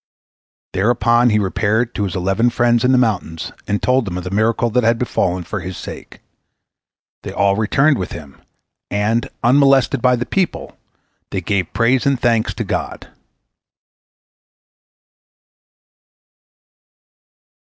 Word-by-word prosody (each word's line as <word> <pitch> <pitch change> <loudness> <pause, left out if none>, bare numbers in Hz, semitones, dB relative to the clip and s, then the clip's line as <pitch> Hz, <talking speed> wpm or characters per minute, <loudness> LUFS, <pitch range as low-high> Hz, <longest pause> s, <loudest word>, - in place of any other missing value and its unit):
Thereupon 120 +4 +2
he 105 - +2
repaired 110 +4 0
to 105 - -2
his 95 - -4
eleven 95 +6 +1
friends 120 -1 +2
in 125 - +3
the 130 - +4
mountains, 95 -9 -1 0.2
and 105 0 0
told 125 -1 +2
them 90 -3 -4
of 90 - -5
the 90 - -6
miracle 115 +3 +1
that 125 +2 +1
had 115 +1 +3
befallen 90 -7 -1
for 105 - -5
his 90 0 -7
sake. - - -10 1.0
They - - -7
all 100 0 +1
returned 135 +7 +2
with 90 - -4
him, 75 -4 -10 0.5
and, 110 +3 0
unmolested 135 0 +3
by 125 0 +4
the 120 0 -3
people, 190 -3 -2 0.5
they 95 - -2
gave 95 -1 -1
praise 125 +4 +2
and 140 -3 +1
thanks 115 -2 +1
to - - -3
God. - - -4
115 Hz, 135 wpm, -18 LUFS, 100-120 Hz, 1.0 s, the